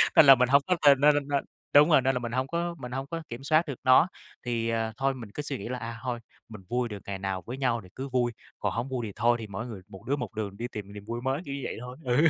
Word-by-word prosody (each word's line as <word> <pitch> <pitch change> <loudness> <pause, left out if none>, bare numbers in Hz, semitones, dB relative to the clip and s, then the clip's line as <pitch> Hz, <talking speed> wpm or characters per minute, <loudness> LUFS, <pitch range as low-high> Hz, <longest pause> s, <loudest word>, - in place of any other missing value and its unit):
Nên - - +9
là 135 -1 +10
mình 125 0 +2
hông 140 +1 +6
có 180 - +3
nên 140 -2 +8
nên 150 0 +7
nên 145 -1 -1
nên 140 -1 0 0.3
đúng 150 +3 +8
rồi, 150 -4 +6
nên 135 0 +1
là - - 0
mình 120 -1 -4
hông 130 +2 0
có 170 +2 -2
mình 125 -1 -7
hông 135 +1 -3
có 165 +1 -5
kiểm 120 +3 -7
soát 155 +3 +3
được 140 - -5
nó, 130 +7 +6 0.4
thì 115 -1 -1
à, 115 -1 -1
thôi 135 +1 +1
mình 115 -5 -9
cứ 150 - -4
suy 140 -2 -4
nghĩ 100 - -6
là, 125 - -2
à, 115 0 -6
thôi 125 -2 -2 0.3
mình 110 -3 -9
vui 125 0 0
được 105 -2 -6
ngày 95 -1 -4
nào 95 -1 -2
với 125 +3 -5
nhau 120 -4 +1
thì 90 - -14
cứ 135 +1 -5
vui, 120 -1 +1 0.3
còn - - -1
hổng 120 +4 -2
vui 125 -3 -2
thì - - -6
thôi, 120 0 +3
thì 110 - -6
mỗi 105 +4 -5
người, 105 -5 -8
một 95 -2 -12
đứa 140 - +1
một 125 -3 -5
đường 100 -2 -4
đi 120 +1 -3
tìm 100 -1 -7
niềm 105 0 -9
vui 120 +1 -4
mới, 135 +4 -1
kiểu 140 0 -4
như 140 - -5
vậy - - -4
thôi. 125 +1 -8
Ừ! 125 -2 +1
125 Hz, 315 wpm, -28 LUFS, 115-135 Hz, 0.4 s, là